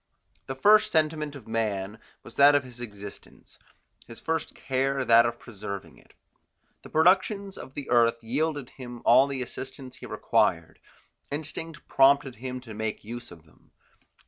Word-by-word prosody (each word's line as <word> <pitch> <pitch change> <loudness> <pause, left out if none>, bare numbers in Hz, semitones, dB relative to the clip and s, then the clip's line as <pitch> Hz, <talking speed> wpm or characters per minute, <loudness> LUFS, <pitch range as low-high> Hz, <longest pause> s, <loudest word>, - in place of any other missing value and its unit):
The 135 - -4
first 215 +8 +5
sentiment 155 -2 0
of 130 -6 -11
man 110 -2 -2 0.2
was - - -12
that 145 +1 +7
of 145 - +3
his 125 -1 -12
existence, 105 -3 -11 0.5
his 115 - -11
first 160 -1 -3
care 135 0 -1
that 115 0 +6
of 120 0 -4
preserving 100 -4 -8
it. - - -24 0.7
The - - -13
productions 190 +4 +2
of 130 - -11
the 140 - -6
earth 115 -1 +4
yielded 145 +2 -2
him 120 -2 -10
all 130 +4 +6
the 135 -2 -3
assistance 130 +1 -8
he - - -9
required; 80 -1 0 0.5
instinct 155 +2 -6
prompted 135 -1 +4
him 130 +2 -5
to 115 -3 -10
make 110 0 -4
use 120 +3 -8
of 85 -2 -14
them. 75 - -26
130 Hz, 155 wpm, -27 LUFS, 115-145 Hz, 0.7 s, that